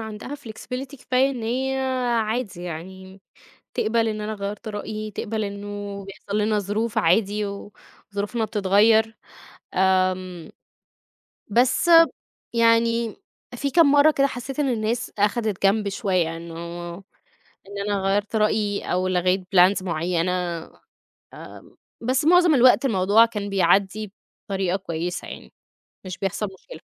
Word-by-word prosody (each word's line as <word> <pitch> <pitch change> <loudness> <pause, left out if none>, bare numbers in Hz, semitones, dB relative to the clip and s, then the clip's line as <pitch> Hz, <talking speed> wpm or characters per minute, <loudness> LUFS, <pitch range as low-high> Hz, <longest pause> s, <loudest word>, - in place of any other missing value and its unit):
عندها 220 +5 -7
flexibility 255 +3 -7
كفاية 260 +2 +2
إن 245 -4 -6
هي 265 +4 -1 0.4
عادي 215 -5 -3
يعني، 190 +3 -8 0.5
تِقبَل 225 +1 +1
إن 215 -1 -3
أنا 215 +1 -3
غيَّرت 205 +2 -6
رأيي، 215 0 -5
تِقبَل 215 +2 -3
إنه 200 0 -6
بيحصل 200 +1 -5
لنا 210 0 +1
ظروف 210 +3 -2
عادي، 205 +4 +2
وظروفنا 205 +2 -6
بتتغيَّر. 215 +2 +3 0.6
آمم 185 -2 0 1.0
بس 250 +9 +2 0.6
يعني 230 -1 +2 0.4
في 280 +3 -2
كام 285 0 +5
مرّة 290 +2 +6
كده 275 -1 +2
حسيت 265 +2 -6
إن 280 -2 +1
الناس 230 +1 -2
أخدت 210 -1 0
جنب 205 +1 +2
شوية، 180 -5 -1
إنه 165 0 -9 1.1
إن 200 0 -8
أنا 200 -1 0
غيَّرت 205 +3 0
رأيي، 210 -1 +1
أو 185 +1 0
لغيت 185 +1 +1 0.2
plans 185 +2 +5
معينة. 170 0 -1 1.0
آمم - - -13 0.2
بس 255 +4 0
معظم 350 -1 +5
الوقت 255 +1 +5
الموضوع 205 -1 +4
كان 210 -3 -4
بيعدّي 195 +2 +1 0.4
بطريقة 190 -2 0
كويسة 175 -2 -4
يعني، - - -10 0.5
مش 185 0 -6
بيحصل 200 +2 -2
مشكلة. - - -12
210 Hz, 125 wpm, -23 LUFS, 190-230 Hz, 1.1 s, مرّة